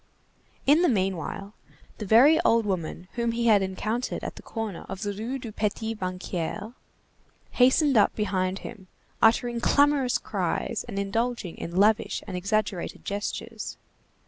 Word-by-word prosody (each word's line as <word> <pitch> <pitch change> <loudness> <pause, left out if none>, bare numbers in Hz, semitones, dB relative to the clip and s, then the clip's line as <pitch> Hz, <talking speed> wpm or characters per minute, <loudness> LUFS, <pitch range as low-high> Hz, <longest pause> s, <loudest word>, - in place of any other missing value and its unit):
In 295 +5 +5
the 355 - +4
meanwhile, 195 - -2 0.5
the 210 - -5
very 270 - +7
old 230 -8 +3
woman 180 -2 -3
whom 235 -1 -1
he 235 0 -1
had 215 -3 +5
encountered 215 +6 -2
at - - -5
the - - -10
corner 220 -6 -5
of 195 +2 -5
the 205 -1 -2
Rue 225 +6 -4
du 240 -4 -7
Petit 220 +1 -2
Banquier 185 +2 -4 0.8
hastened 260 +3 +4
up 210 -3 +4
behind 190 -3 -1
him, 200 -5 -9 0.3
uttering 235 +1 +3
clamorous 285 -2 +3
cries - - -2
and 210 -4 -6
indulging 220 -1 -2
in 170 - -6
lavish 210 +3 +2
and 190 - -6
exaggerated 200 0 -2
gestures. 205 +1 -4
215 Hz, 145 wpm, -26 LUFS, 195-235 Hz, 0.8 s, very